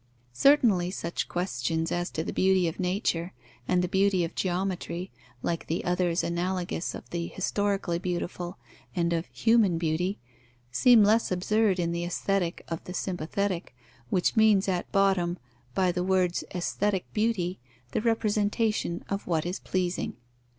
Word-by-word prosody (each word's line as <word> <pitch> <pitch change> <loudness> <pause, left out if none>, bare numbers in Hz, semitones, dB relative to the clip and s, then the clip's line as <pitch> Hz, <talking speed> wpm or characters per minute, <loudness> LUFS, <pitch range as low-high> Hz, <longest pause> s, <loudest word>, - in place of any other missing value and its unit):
Certainly, 215 - +4
such 170 -2 -3
questions 165 -2 -1
as 175 +1 -1
to 160 - -3
the - - -4
beauty 190 -1 +3
of 165 - -4
nature 180 -2 -1 0.3
and 180 0 +2
the - - +1
beauty 190 0 +2
of 165 - -3
geometry, 185 -1 -2 0.3
like 170 -1 -2
the 165 - -2
others 180 -1 +1
analogous 175 0 -2
of - - -9
the 170 -1 -2
historically 195 -2 -1
beautiful 175 0 -3 0.4
and 170 -1 +1
of 165 0 -1
human 225 -7 +3
beauty, 170 +4 0 0.5
seem 235 - +6
less 220 +1 +3
absurd 195 +2 +2
in 170 -1 0
the 170 0 -2
Aesthetic 175 0 -1
of 165 -1 -4
the 180 - -6
sympathetic, 180 -2 -2 0.3
which 180 - +1
means, 215 -3 +5
at 180 -2 -1
bottom, 190 -3 +2 0.4
by 185 -1 +3
the 180 0 -1
words 185 -2 +1
"aesthetic 190 +1 -1
beauty" 210 -5 0 0.3
the - - 0
representation 215 -4 0
of 200 0 -3
what 165 -2 0
is 180 +2 -3
pleasing. 180 -1 -2
180 Hz, 145 wpm, -28 LUFS, 175-200 Hz, 0.5 s, seem